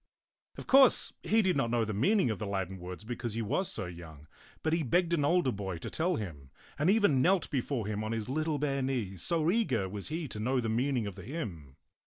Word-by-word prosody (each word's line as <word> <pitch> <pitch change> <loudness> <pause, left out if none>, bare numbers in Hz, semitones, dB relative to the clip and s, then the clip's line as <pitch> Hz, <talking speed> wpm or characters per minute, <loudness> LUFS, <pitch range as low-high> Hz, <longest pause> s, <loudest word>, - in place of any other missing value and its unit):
Of - - -7
course 265 -1 +6
he 220 +1 +2
did 185 -3 +2
not 135 -4 +1
know 115 -1 +1
the 110 - -3
meaning 155 - +2
of 110 - -4
the 105 - -3
Latin 95 -1 -3
words 90 +3 -8
because 120 -1 -4
he 115 - -1
was 185 - -1
so - - -3
young; 85 -4 -10 0.4
but 160 - +1
he 165 - +2
begged 170 +5 +1
an 155 -4 +2
older 170 -2 +3
boy 95 -4 -4
to - - -7
tell 175 +3 0
him, 75 - -6 0.3
and 150 +5 +3
even 200 -11 +4
knelt 185 +3 +2
be 135 - +1
fore 120 -4 -3
him 105 0 -3
on 110 - -3
his 115 -2 -3
little 155 +3 -1
bare 140 -1 -1
knees, 115 -9 -2
so 165 -1 +2
eager 135 - +1
was 100 +1 -5
he 160 +1 -3
to 105 - -6
know 125 +4 +1
the 115 -2 -1
meaning 125 +1 0
of 100 - -5
the - - -10
hymn. 90 - -6
125 Hz, 240 wpm, -31 LUFS, 100-160 Hz, 0.4 s, course